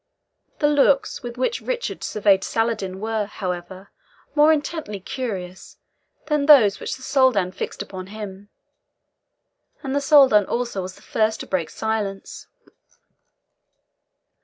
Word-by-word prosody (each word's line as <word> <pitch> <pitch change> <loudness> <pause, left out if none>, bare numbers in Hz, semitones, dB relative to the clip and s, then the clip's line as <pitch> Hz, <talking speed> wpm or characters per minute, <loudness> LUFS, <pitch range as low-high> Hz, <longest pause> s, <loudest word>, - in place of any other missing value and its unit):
The 295 - +2
looks 285 -1 +2
with 240 0 -7
which 260 - -1
Richard - - -4
surveyed 200 -2 +2
Saladin 225 -5 -2
were, 220 -1 -2
however, 185 -1 -6 0.4
more 300 +1 +5
intently 300 -8 -2
curious 190 -5 -6 0.5
than 300 -2 0
those 240 -10 +7
which - - -4
the 260 - -14
Soldan 255 -11 +2
fixed 185 - -5
upon 185 -1 -9
him; 205 -1 -9 1.3
and 270 -1 -3
the 285 - +1
Soldan 270 -8 +5
also 235 -5 -2
was 185 0 -7
the - - -19
first 220 0 0
to - - -6
break 175 -4 -2
silence. 210 -3 -4
220 Hz, 125 wpm, -22 LUFS, 195-270 Hz, 1.3 s, those